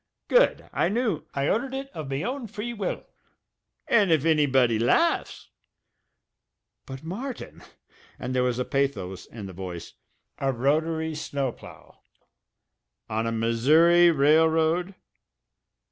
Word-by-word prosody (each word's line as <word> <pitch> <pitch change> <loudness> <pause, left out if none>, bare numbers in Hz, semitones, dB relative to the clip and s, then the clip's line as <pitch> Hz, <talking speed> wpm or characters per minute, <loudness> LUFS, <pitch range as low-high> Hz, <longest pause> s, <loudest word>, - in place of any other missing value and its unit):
"Good! - - +3
I - - +1
knew 215 -7 -1
" - - -42
"I 140 0 0
ordered 260 +4 -1
it 270 0 -5
of 155 -4 -7
me 135 +6 -2
own 255 -1 -4
free 220 +3 -5
will. 210 -4 -4 0.8
And 205 -6 +3
if 155 -4 +3
annybody 135 -8 +3
laughs 330 - +1 0.6
" - - -58
"But, 135 0 -8
Martin" 235 +11 -7 0.6
and 130 0 -5
there 130 - +1
was 125 -1 0
pathos 130 -10 -2
in 110 -3 -9
the 95 - -8
voice 90 -2 -7 0.5
"a 135 -1 +1
rotary 160 +5 0
snow 140 -3 -3
plough? - - -15 1.1
On 110 +1 -1
a - - -1
Missouri 150 +10 +4
railroad? 160 +4 +3
155 Hz, 130 wpm, -25 LUFS, 125-180 Hz, 1.1 s, Missouri